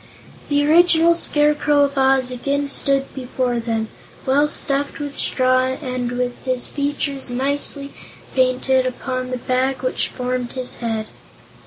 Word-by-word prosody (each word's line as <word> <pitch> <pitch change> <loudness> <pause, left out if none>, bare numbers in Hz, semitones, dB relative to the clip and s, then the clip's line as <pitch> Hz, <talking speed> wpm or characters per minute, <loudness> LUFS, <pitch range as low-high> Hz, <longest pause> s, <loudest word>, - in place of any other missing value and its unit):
The 290 0 +2
original 335 +1 +5
Scarecrow 295 -2 +3
of 280 0 0
Oz 265 -1 +3
again 280 +3 -2
stood 275 -1 +1
before 250 -2 -2
them, 225 -1 -2 0.4
well 280 +3 +3
stuffed 280 -1 -1
with 285 -1 -5
straw 255 0 +1
and 255 -3 -3
with 245 0 -3
his 255 -2 -1
features 280 -1 -2
nicely 280 +2 0 0.4
painted 260 0 +2
upon 255 0 -4
the 255 - -2
bag 255 +2 -1
which 255 - 0
formed 250 -1 -3
his 255 -1 -5
head. 225 -2 -2
260 Hz, 135 wpm, -20 LUFS, 255-285 Hz, 0.4 s, original